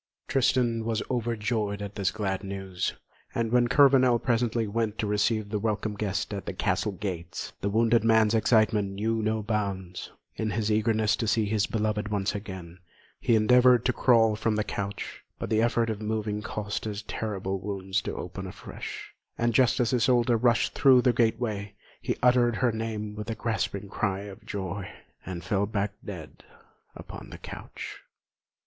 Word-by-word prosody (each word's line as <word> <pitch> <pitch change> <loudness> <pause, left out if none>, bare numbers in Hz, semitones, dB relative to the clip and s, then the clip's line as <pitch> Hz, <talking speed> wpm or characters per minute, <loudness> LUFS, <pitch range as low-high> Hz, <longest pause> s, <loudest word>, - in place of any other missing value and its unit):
Tristan 120 -3 +2
was 115 -1 -1
overjoyed 110 -3 -1
at 100 -1 -6
this 100 -2 0
glad 95 -2 -2
news, 95 -2 -3 0.4
and 115 -1 0
when 120 0 +4
Kurvenal 130 -2 +5
presently 115 -1 +1
went 110 0 -1
to - - -1
receive 105 +1 +1
the 105 0 -1
welcome 110 0 -1
guest 100 0 -2
at 100 - -5
the - - -2
castle 105 - 0
gates, 90 -4 -5
the 100 - 0
wounded 115 +2 +3
man's 110 -1 +4
excitement 110 -3 +3
knew 110 +3 0
no 110 0 0
bounds. 100 -4 -3 0.3
In 110 - -1
his 105 +1 0
eagerness 110 0 +2
to 115 - -2
see 110 0 +2
his 105 0 +1
beloved 105 -1 -1
one 105 -2 -1
once 95 - -1
again, 95 -4 -7 0.4
he 115 - +3
endeavoured 125 +2 +5
to 130 - +3
crawl 115 -4 +4
from 110 0 0
the 105 - +1
couch; 100 -1 -5
but - - -5
the 110 0 +3
effort 115 0 +2
of 110 -1 -5
moving 105 -1 -2
caused 105 0 -4
his 105 -2 -4
terrible 95 -3 -3
wounds 95 0 -2
to - - -4
open 95 +2 -6
afresh, 95 - -8 0.2
and 120 0 +1
just 130 +3 +4
as 120 0 +2
Isolda 120 -1 +3
rushed 120 0 +2
through 130 -3 +6
the 125 - +4
gateway, 110 -3 0 0.3
he - - -2
uttered 120 -2 +4
her 125 +1 +2
name 110 -1 -4
with 105 +2 -6
a 115 - -2
gasping 110 -3 -2
cry 100 -1 -1
of 100 -1 -10
joy, 100 -1 -4 0.4
and 90 -3 -5
fell 100 +3 0
back 100 -1 -1
dead 90 -6 -9 0.5
upon - - -9
the - - -9
couch. - - -8
110 Hz, 170 wpm, -27 LUFS, 100-115 Hz, 0.5 s, through